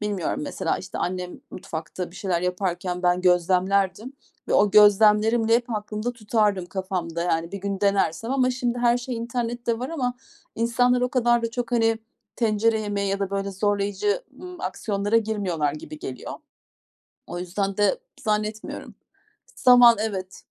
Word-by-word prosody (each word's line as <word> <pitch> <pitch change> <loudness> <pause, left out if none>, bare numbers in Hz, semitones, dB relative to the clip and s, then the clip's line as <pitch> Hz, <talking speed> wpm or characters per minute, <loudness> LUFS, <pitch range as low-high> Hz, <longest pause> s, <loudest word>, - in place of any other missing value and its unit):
Bilmiyorum 205 -5 -2
mesela - - -2
işte - - -7
annem 180 0 -3
mutfakta 170 +1 -6
bir 180 - -14
şeyler 185 -4 -1
yaparken 180 0 -2
ben 180 0 +2
gözlemlerdim 185 +5 +2 0.4
ve - - +1
o 205 - +4
gözlemlerimle 215 +2 +5
hep 240 +1 0
aklımda 215 +3 -3
tutardım 210 -4 0
kafamda, 180 -3 -3
yani. 165 -1 -1
Bir 200 - -4
gün 195 0 -4
denersem 200 +1 +1
ama 255 -2 +2
şimdi 245 -1 -2
her 240 0 +3
şey 245 0 -5
internette 235 0 -2
var 255 +2 -4
ama 255 -7 -2 0.4
insanlar 245 +2 +2
o 250 - +1
kadar 240 -2 +2
da 230 - -1
çok 245 +1 -4
hani 225 -1 +2 0.4
tencere 220 -1 +2
yemeği 205 -2 -2
ya 195 - -1
da 195 -1 -2
böyle 200 0 -2
zorlayıcı, 205 - 0 0.2
ımm, 360 -1 -9
aksiyonlara 200 +3 -1
girmiyorlar 195 -10 0
gibi 155 0 -9
geliyor. 130 - -7 1.0
O 175 - -5
yüzden 195 +2 -3
de 210 - +2 0.2
zannetmiyorum. 215 0 -3 0.6
Zaman, 245 -2 +7
evet. 195 -3 -4
210 Hz, 150 wpm, -24 LUFS, 185-235 Hz, 1.0 s, Zaman